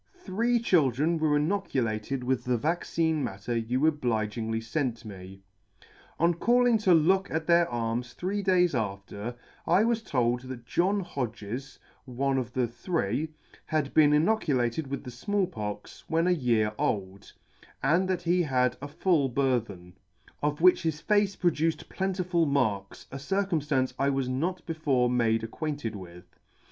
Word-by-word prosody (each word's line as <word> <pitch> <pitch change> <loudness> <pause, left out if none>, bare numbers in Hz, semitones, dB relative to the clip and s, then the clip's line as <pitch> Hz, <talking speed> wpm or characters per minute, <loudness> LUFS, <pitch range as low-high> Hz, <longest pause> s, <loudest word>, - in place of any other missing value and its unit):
Three 240 - 0
children 160 - +2
were 155 -2 +2
inoculated 135 - -1
with 130 0 0
the 125 -1 +1
vaccine 160 +2 0
matter 100 +5 -4
you 120 +5 0
obligingly 115 -6 0
fent 120 -1 -3
me. 95 -1 -10 0.8
On 170 +1 +4
calling 240 +5 +3
to 190 -4 +4
look 190 +5 +3
at 160 0 -2
their 170 0 +4
arms 120 0 -2
three 195 +3 -2
days 180 -3 +3
after, 100 0 -4 0.3
I 180 +5 +4
was 230 0 +1
told 125 - 0
that 130 -2 -8
John 195 +9 +1
Hodges, 125 - -5 0.3
one 135 +1 0
of 125 - -4
the 125 -2 +1
three, 120 - -2 0.4
had 155 -3 -1
been 150 -2 +6
inoculated 150 - +1
with 140 +1 -5
the 125 - -7
Small 195 +11 0
Pox 105 - -7
when 165 +1 +1
a 180 - +3
year 115 -9 +1
old, 100 -1 -2 0.5
and 170 +7 +3
that 180 -2 -1
he 175 +1 +2
had 125 -5 +1
a 145 - -5
full 150 -2 +1
burthen, 120 -9 -1 0.5
of 150 +1 -1
which 180 +1 +6
his 160 -2 -2
face 205 +1 +2
produced 165 -2 0
plentiful 180 -3 0
marks, 110 -9 -1
a 135 - -6
circumflance 150 -7 0
I 140 - +2
was 135 -2 0
not 165 +8 -2
before 140 -7 +1
made 115 -2 +2
acquainted 140 -1 -4
with. 90 -2 -12
140 Hz, 150 wpm, -28 LUFS, 120-170 Hz, 0.8 s, been